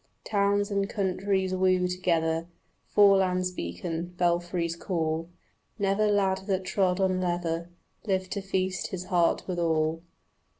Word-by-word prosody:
Towns 200 0 +1
and 200 0 0
countries 190 -1 0
woo 185 -1 +2
together, 165 -2 0 0.4
Forelands 190 -3 +4
beacon, 165 - -5
belfries 175 -1 0
call; 165 -2 -2 0.5
Never 200 +1 +2
lad 195 -2 +2
that 190 -2 0
trod 185 -1 +1
on 185 -1 +1
leather 175 -1 -2 0.4
Lived 185 -2 0
to 200 - -2
feast 190 -1 -1
his 185 -1 -5
heart 170 -1 +3
with 180 -2 -2
all. 160 -1 +1
185 Hz, 125 wpm, -28 LUFS, 170-195 Hz, 0.5 s, Forelands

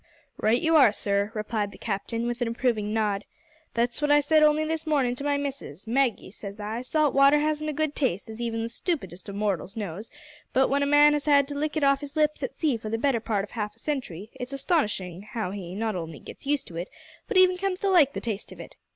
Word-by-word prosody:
"Right 225 +3 +2
you 325 +3 +2
are, 265 -8 +7
sir," 200 0 0
replied 210 -1 -2
the - - -13
Captain, 230 +2 -3
with 240 +1 -3
an 240 - +1
approving 230 -3 0
nod. 210 -2 0 0.5
"That's 240 +4 0
what 295 - +1
I 290 0 +6
said 310 +2 +3
only 305 0 +4
this 320 0 -3
mornin' 275 -5 +2
to 280 - -5
my 285 0 +1
missus. 275 - -6
`Maggie,' 235 -4 0
says 200 -1 -8
I, 215 +2 -3
`salt 300 +3 +1
water 275 +2 +6
hasn't 305 0 0
a - - -2
good 310 0 -1
taste, 210 - -1
as 220 +1 -8
even 225 -1 -2
the - - -2
stoopidest 230 - -3
of 200 - -6
mortals 200 0 -2
knows, 205 +1 -5 0.4
but 260 - +3
w'en 280 +1 +1
a 280 - +2
man 295 +1 +6
has 295 -1 -1
had 280 -2 +5
to 290 - -4
lick 300 +2 -2
it 305 - 0
off 275 0 +4
his 290 +1 -8
lips 305 -1 +1
at - - -4
sea 295 -7 +1
for 220 -1 -7
the 225 - -1
better 255 0 +1
part 215 -3 -1
of 205 - -9
half 210 -2 -4
a - - -25
century, 230 - -4
it's 250 +2 -5
astonishin' 210 - -1
how 215 -2 -4
he 185 -3 -6
not 220 0 -1
only 165 -3 -5
gits 275 - -12
used 290 -1 +1
to 165 - -8
it, 175 +3 -4 0.4
but 445 - 0
even 370 0 +6
comes 375 0 -2
to 400 - +1
like 335 -8 +5
the - - -3
taste 220 -3 -4
of - - -11
it.' - - -10
240 Hz, 245 wpm, -26 LUFS, 210-295 Hz, 0.5 s, are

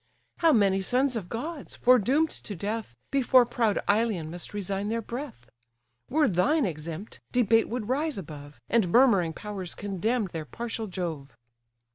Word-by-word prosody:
How 330 -2 +4
many 195 -6 +3
sons 255 +5 +1
of 200 -6 -4
gods, 290 +6 -5
foredoom'd 255 +6 +4
to 205 - -7
death, 205 - -4 0.2
Before 260 -2 +5
proud 230 -3 0
Ilion 205 -7 +1
must 175 -1 -6
resign 200 0 -3
their 230 +1 0
breath! 235 - -7 0.6
Were 300 +1 +3
thine 205 - +2
exempt, 165 +3 -6
debate 225 -2 +3
would 235 -3 -3
rise 290 +3 0
above, 145 -6 -9
And 225 -6 +2
murmuring 205 -9 +5
powers 195 -1 -6
condemn 205 +4 -1
their 160 -2 -4
partial 225 +5 -4
Jove. 165 -9 -5
215 Hz, 145 wpm, -27 LUFS, 180-245 Hz, 0.6 s, Before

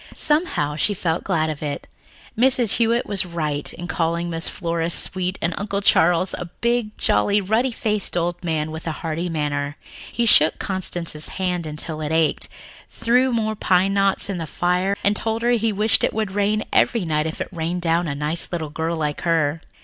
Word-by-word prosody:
Somehow, 295 - 0
she 205 +6 +1
felt 170 -2 -1
glad 155 -1 0
of 150 - -8
it. 145 -2 -4 0.5
Mrs. 245 -2 +4
Hewitt 235 +1 +2
was 200 -1 +3
right 155 -5 -2
in 175 - -8
calling 170 0 -1
Aunt 165 - -2
Flora 170 -1 -2
sweet, 185 +2 +1
and 170 +1 0
Uncle 200 -1 -2
Charles 175 0 +4
was - - -5
a - - -3
big, 235 -2 0
jolly, 200 - +3
ruddy 220 +6 +1
faced 210 -5 0
old 175 +1 -2
man 155 -2 -1
with 160 +1 -7
a - - 0
hearty 165 +2 -2
manner. 145 -2 -2 0.3
He 235 - 0
shook 160 -8 +5
Constance's 175 -5 -4
hand 180 -3 -2
until 155 +1 -5
it 150 0 -3
ached, 160 -1 +1 0.4
threw 250 +3 +2
more 220 -2 0
pine 190 -2 +2
knots 195 -1 +2
in 195 -3 -3
the 165 - -4
fire 180 +5 0
and 205 +1 +3
told 225 +1 -2
her 240 - +3
he 225 -2 +2
wished 210 +2 +2
it - - +1
would 215 -3 -1
rain 205 +2 0
every 230 -7 +2
night 155 -1 0
if 160 - -6
it - - -4
rained 175 0 -3
down 170 +1 +1
a 140 - -3
nice 150 +3 -2
little 160 -4 -3
girl 165 +2 -2
like 150 -2 -2
her. 160 -2 +1
175 Hz, 195 wpm, -22 LUFS, 160-205 Hz, 0.5 s, shook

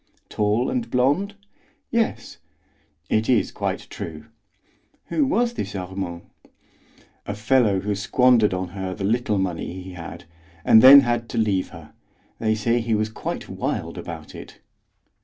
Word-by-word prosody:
"Tall 105 +4 0
and 250 -2 -2
blond?" 145 +12 +1 0.6
"Yes. 230 -1 -1 0.7
"It - - 0
is - - +2
quite - - -3
true." - - -7 0.8
"Who 295 -4 +1
was 240 -2 +1
this - - -5
Armand?" 90 -2 -5 1.0
"A 100 - -3
fellow 105 -2 +2
who 105 +1 -1
squandered 115 +2 +3
on 95 -1 -3
her 95 0 -5
the 100 - -6
little 110 0 0
money 95 -4 -2
he 95 0 -9
had, 85 0 -9 0.4
and 110 - +7
then 140 +3 +10
had 120 -2 -1
to - - -5
leave 100 -4 +1
her. 80 -3 -13 0.5
They 110 -1 +1
say 115 +2 +1
he 115 -1 0
was 110 +1 0
quite 110 - -5
wild - - -4
about - - -8
it." - - -11
110 Hz, 145 wpm, -23 LUFS, 95-125 Hz, 1.0 s, then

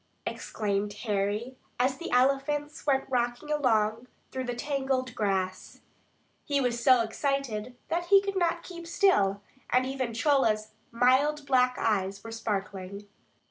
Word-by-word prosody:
exclaimed 205 -1 -2
Harry, 210 +4 -1 0.2
as 260 +1 +1
the 340 - -5
elephants 275 +4 +1
went 270 -1 +2
rocking 245 +3 -1
along 230 -5 +1 0.2
through 260 - -3
the 245 -1 -3
tangled 265 -2 -1
grass. 190 -3 -2 0.6
He 285 -1 0
was 240 -3 0
so 255 -2 +6
excited 250 -1 -2
that 345 +1 -1
he 395 +2 +7
could 395 0 -4
not 345 -2 +1
keep 340 -2 -9
still, 205 - +2 0.3
and 255 +1 +3
even 260 -3 -3
Chola's 225 -5 +2 0.2
mild 265 +5 +3
black 250 -2 +3
eyes 200 -2 0
were 225 - -8
sparkling. 200 -2 -4
250 Hz, 135 wpm, -28 LUFS, 215-280 Hz, 0.6 s, he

